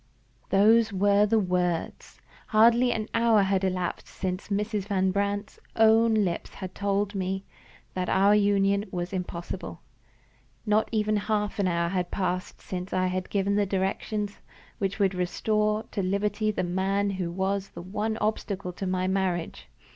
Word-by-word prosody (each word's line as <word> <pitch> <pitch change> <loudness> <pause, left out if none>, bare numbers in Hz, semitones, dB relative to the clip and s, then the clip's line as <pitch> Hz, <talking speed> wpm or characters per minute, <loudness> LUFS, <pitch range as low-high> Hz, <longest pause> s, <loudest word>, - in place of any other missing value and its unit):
Those 220 +3 +5
were 200 +1 +3
the 225 +2 +3
words! 180 -4 -1 0.3
Hardly 235 +3 +5
an 220 -2 -2
hour 230 -3 +4
had 195 0 +1
elapsed 180 -2 -2
since 185 0 -4
Mrs. 205 0 -2
Van 190 -2 +1
Brandt's 200 +1 -2 0.2
own 225 0 +5
lips 190 -6 -1
had 185 -1 -7
told 200 0 -1
me 190 0 -3 0.5
that 180 -1 -2
our 200 +2 +4
union 200 -1 +3
was 175 0 -4
impossible. 175 -2 -5 0.8
Not 215 0 +2
even 215 -1 +1
half 210 0 -1
an 195 - +2
hour 170 -1 0
had 180 -1 -1
passed 185 -1 -3
since 180 0 -6
I 185 0 +2
had 185 0 -2
given 200 0 0
the 205 -1 +2
directions 200 +2 -2 0.4
which 195 -1 -1
would 195 -2 +2
restore 210 +4 0
to 205 - -2
liberty 205 +3 0
the 210 - -1
man 195 +3 0
who 185 -3 -3
was 190 +2 -1
the - - -9
one 215 +4 -2
obstacle 200 -4 -2
to 190 +2 -4
my 185 0 0
marriage. 180 - -1
200 Hz, 155 wpm, -27 LUFS, 185-210 Hz, 0.8 s, Those